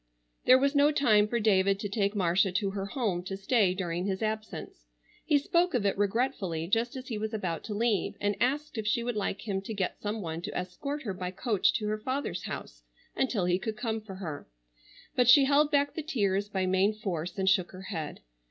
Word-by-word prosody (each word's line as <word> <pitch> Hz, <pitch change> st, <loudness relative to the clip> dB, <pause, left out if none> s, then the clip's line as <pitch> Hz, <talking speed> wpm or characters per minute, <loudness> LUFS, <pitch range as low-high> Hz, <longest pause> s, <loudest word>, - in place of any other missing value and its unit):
There 255 Hz, -, +8 dB
was 275 Hz, +2 st, +2 dB
no 290 Hz, +1 st, +5 dB
time 215 Hz, -8 st, +4 dB
for 235 Hz, +2 st, -1 dB
David 195 Hz, -2 st, +3 dB
to 205 Hz, -, -2 dB
take 200 Hz, 0 st, 0 dB
Marcia 185 Hz, 0 st, +2 dB
to 200 Hz, 0 st, 0 dB
her 195 Hz, 0 st, -4 dB
home 200 Hz, -6 st, -1 dB
to 195 Hz, +1 st, -4 dB
stay 195 Hz, -2 st, +2 dB
during 175 Hz, 0 st, -2 dB
his 190 Hz, +2 st, -2 dB
absence. 215 Hz, -, -5 dB, 0.4 s
He 305 Hz, -2 st, +3 dB
spoke 340 Hz, +3 st, +1 dB
of 220 Hz, -5 st, +1 dB
it 200 Hz, -, +2 dB
regretfully 200 Hz, -5 st, 0 dB
just 230 Hz, +6 st, 0 dB
as 260 Hz, -1 st, -7 dB
he 220 Hz, -3 st, -3 dB
was 220 Hz, +1 st, -3 dB
about 175 Hz, -6 st, -3 dB
to 210 Hz, -, -4 dB
leave, 220 Hz, -3 st, 0 dB
and 205 Hz, 0 st, 0 dB
asked 285 Hz, -1 st, 0 dB
if 210 Hz, -, -3 dB
she 235 Hz, +3 st, +1 dB
would 240 Hz, -1 st, -2 dB
like 205 Hz, +1 st, -3 dB
him 195 Hz, -2 st, -1 dB
to 215 Hz, +3 st, -6 dB
get 190 Hz, -2 st, -2 dB
some 210 Hz, 0 st, -3 dB
one 165 Hz, 0 st, -4 dB
to -, -, -5 dB
escort 275 Hz, +12 st, -4 dB
her 205 Hz, -6 st, -3 dB
by 180 Hz, -1 st, -4 dB
coach 195 Hz, +2 st, +1 dB
to 225 Hz, -5 st, -1 dB
her 215 Hz, 0 st, -1 dB
father's 255 Hz, -7 st, -3 dB
house -, -, -7 dB, 0.3 s
until 235 Hz, -8 st, 0 dB
he 180 Hz, +1 st, +2 dB
could 220 Hz, 0 st, -4 dB
come 225 Hz, -1 st, -2 dB
for 205 Hz, -3 st, -9 dB
her; 165 Hz, -6 st, -6 dB, 0.7 s
but 250 Hz, -1 st, +3 dB
she 270 Hz, +2 st, +8 dB
held 290 Hz, +2 st, +4 dB
back 285 Hz, -1 st, +2 dB
the 320 Hz, -, -3 dB
tears 205 Hz, -8 st, 0 dB
by 190 Hz, -2 st, -1 dB
main 190 Hz, +3 st, +2 dB
force 180 Hz, -5 st, -4 dB
and 190 Hz, -1 st, -1 dB
shook 190 Hz, -2 st, +3 dB
her 185 Hz, -, -10 dB
head. 160 Hz, -5 st, -5 dB
205 Hz, 220 wpm, -29 LUFS, 190-240 Hz, 0.7 s, There